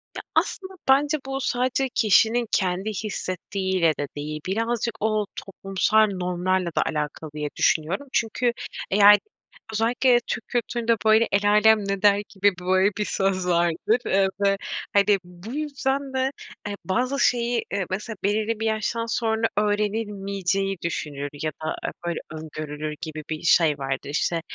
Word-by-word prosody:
Ya, - - -4
aslında 380 0 0 0.2
bence 290 +3 +4
bu 270 0 -3
sadece 255 +1 0
kişinin 225 +2 +4
kendi 190 +2 0
hissettiğiyle 190 -4 -1
de 145 - -1
değil. 150 +1 -5
Birazcık 230 +4 -1
o 215 -1 +1
toplumsal 195 +3 +1
normlarla 180 0 0
da - - +3
alakalı 150 0 -3
diye 150 -1 -3
düşünüyorum. 170 - +1
Çünkü 235 +1 +1 0.4
eğer 205 +1 +8 0.6
özellikle 240 +3 +3
Türk 220 - -4
kültüründe, 235 -1 0
böyle, 220 +1 +5
el 205 +1 +3
âlem 220 +1 +6
ne 195 0 -2
der 205 -1 +5
gibi, 200 0 +2
böyle, 185 +2 +3
bir 210 - 0
söz 190 -2 0
vardır. 175 +6 +2
Iıı, 195 0 +3 0.2
ve, 195 0 +3 0.4
hani, 200 0 +4
bu 180 +6 -10
yüzden 280 -2 -2
de, 260 +1 +1 0.4
eee, 205 - -3
bazı 250 +8 0
şeyi, 240 -2 +2
eee, 200 -2 0
mesela 210 +4 -4
belirli 215 +2 0
bir 225 - -2
yaştan 220 +1 -1
sonra 225 -1 0
öğrenilmeyeceği 200 -2 -1
düşünülür 145 -4 -3
ya 155 - 0
da, - - -1
eee, - - -2 0.2
böyle, 170 - -1
öngörülür 155 -1 -6
gibi 155 -1 -6
bir 155 -1 -3
şey 155 -4 +4
vardır. 135 0 -4
İşte, 165 +3 0
205 Hz, 145 wpm, -24 LUFS, 180-230 Hz, 0.6 s, eğer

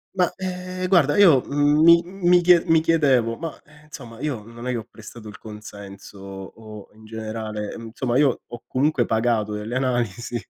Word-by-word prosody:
ma 180 -2 +2
eh 185 0 -5
guarda, 155 -6 +3
io 170 -10 +6
mi 150 +4 +5
mi 180 -1 +2
chie 175 -1 +5
mi 165 -2 +3
chiedevo, 135 -8 +2
ma, 165 - -4
ehm, 150 0 -21
insomma 120 -6 -11
io 135 -7 -4
non 115 +3 -10
è - - 0
che 125 - -2
ho 110 - -7
prestato 110 0 -12
il 105 - -11
consenso, 100 -2 -11
o 100 +2 -11
in 110 +1 -18
generale 110 -1 -6
mhmm, 115 -1 -9
somma 125 -1 -1
io 140 -3 +2
ho 120 0 -11
comunque 130 -2 +1
pagato 110 -2 0
delle 105 +4 -4
analisi 120 -3 -2
120 Hz, 175 wpm, -22 LUFS, 110-155 Hz, -, io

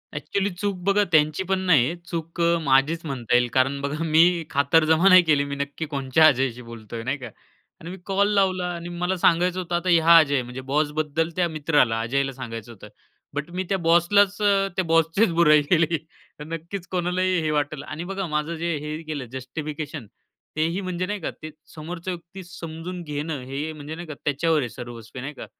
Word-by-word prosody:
Actually 200 0 -1
चूक 200 +2 -2
बघा 200 +1 +3
त्यांची 155 +2 +3
पण 190 -1 +2
नाही 155 -10 +5
आहे. 165 - -2
चूक 165 0 -5
अ, 170 0 +3
माझीच 145 +4 +2
म्हणता 125 -5 -1
येईल 125 0 +4
कारण 135 +2 +2
बघा 145 +3 -3
मी 165 +2 +4
खातरजमा 160 +5 +3
नाही 185 -1 +9
केली, 150 -4 +3
मी 140 0 -5
नक्की 140 +3 -4
कोणच्या 140 +1 +2
अजयशी 130 -3 +1
बोलतोय 115 -1 -8
नाही 130 +4 -2
का? 125 -3 -8 0.5
आणि 165 - -9
मी 190 - -8
कॉल 200 0 +2
लावला 190 -2 +2
आणि 170 0 -7
मला 180 +2 -2
सांगायचं 175 +1 +2
होतं 175 -1 -3
आता 175 +1 -1
ह्या 170 -1 +7
अजय 140 -4 +4
म्हणजे 125 +1 -7
बॉसबद्दल 155 +2 0
त्या 180 -1 +2
मित्राला 145 -7 +1
अजयला 135 +4 -1
सांगायचं 120 -3 -7
होतं, 105 -2 -12 0.5
बट 150 +3 -4
मी 185 +2 -2
त्या 195 - +1
बॉसलाच 195 +4 +4
अ, 200 -1 +3
त्या 190 - 0
बॉसचेच 165 +5 +2
बुराई 150 -3 +5
केली. 165 -1 +3 0.4
तर - - -6
नक्कीच 165 +4 -6
कोणालाही 180 0 0
हे 155 -1 -1
वाटंल. 145 -1 -1
आणि 155 +3 -6
बघा, 195 +1 -4
माझं 150 +2 -2
जे 170 0 -2
हे 150 +2 -5
केलं 150 -4 -5
जस्टिफिकेशन 145 0 -6 0.5
तेही 165 +5 0
म्हणजे 185 -1 -3
नाही 205 +2 -3
का, 165 - -3
ते 155 - -5 0.3
समोरच्या 170 +3 -5
व्यक्ती 175 +2 -10
समजून 175 0 -7
घेणं, 150 -1 -4
हे 140 +5 -4
म्हणजे 150 +1 -8
नाही 175 +1 -8
का 155 - -6
त्याच्यावर 155 +2 +1
आहे 125 -4 -2
सर्वस्वी 120 +1 -9
नाही 140 +3 -6
का? - - -9
160 Hz, 190 wpm, -24 LUFS, 140-175 Hz, 0.5 s, नाही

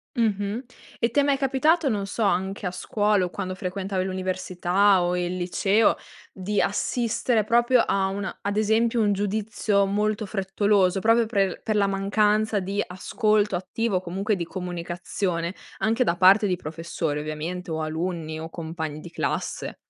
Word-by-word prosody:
Mh-mh, 215 0 0 0.4
e 230 - +2
ti 285 +5 +2
è - - +2
mai 280 -1 +2
capitato 285 +4 +2
non 205 -5 0
so, 210 +3 -3
anche 195 0 0
a 180 - -1
scuola, 205 +2 +1
o - - -4
quando 185 +1 -4
frequentavi 190 0 -3
l'università, 185 +1 +1
o 175 0 0
il 180 0 -2
liceo 195 +4 +2 0.4
di 195 +2 -2
assistere 230 +2 0
proprio 240 +2 +4
a 195 -4 +2
una 195 0 -4
ad 200 +1 -2
esempio 225 +2 +2
un 205 -2 +3
giudizio 205 0 0
molto 210 +2 0
frettoloso, 195 -1 +1
proprio 225 +3 +4
pre 200 -3 +2
l - - -10
per 215 -2 0
la 200 -1 +3
mancanza 210 +2 +1
di 195 +2 -2
ascolto 210 +2 0
attivo, 190 +2 -1
comunque 195 +4 -1
di 175 - -3
comunicazione, 175 0 -3 0.2
anche 225 +3 +1
da 175 -7 0
parte 195 +4 +6
di 185 -3 0
professori 160 -2 -3
ovviamente, 160 +4 -5
o 160 0 -2
alunni, 160 0 -3
o 160 +1 -6
compagni 160 -2 -5
di 170 - -10
classe? - - -3
195 Hz, 160 wpm, -25 LUFS, 180-215 Hz, 0.4 s, parte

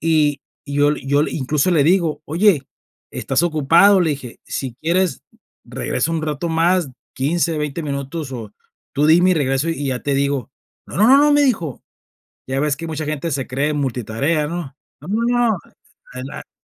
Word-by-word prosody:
y 155 -3 +2 0.2
y 140 -1 -6
yo 145 +1 +4
le - - -5
y 135 - -12
yo 145 +1 +3
le, - - -2
incluso 150 +4 0
le 155 - +4
digo: 165 -4 +2
"Oye, 170 -1 +3 0.5
¿estás - - -1
ocupado?", 170 +5 +4
le 165 -3 +2
dije. 135 -4 -6
"Si 130 -3 -5
quieres 170 -2 0 0.4
regreso 165 - -2
un 160 -1 -1
rato 155 +2 -2
más, 170 0 +2 0.3
15 165 +5 0
o - - -2
20 150 +2 -3
minutos, 140 +1 -4
o 110 -5 -7 0.4
tú 145 +2 +2
dime 175 +4 +5
y - - +4
regreso 135 +1 0
y 145 -4 -2
ya 130 -1 -2
te 140 - 0
digo". 140 -3 -1 0.4
"No, - - -8
no, 210 +4 +5
no, 270 - +8
no", 295 0 +5
me 290 - +4
dijo. 175 - -1 0.7
Ya 135 +1 -1
ves 145 -1 0
que 165 - -6
mucha 155 -1 -4
gente 155 +2 -3
se 135 -1 -2
cree 145 +4 -1
multitarea, 135 +3 -1
¿no? 165 -5 -5 0.3
"No, 150 - -11
no, 220 +4 0 0.2
no. 215 - +1 0.5
Adelante, - - -9
150 Hz, 190 wpm, -20 LUFS, 140-170 Hz, 0.7 s, no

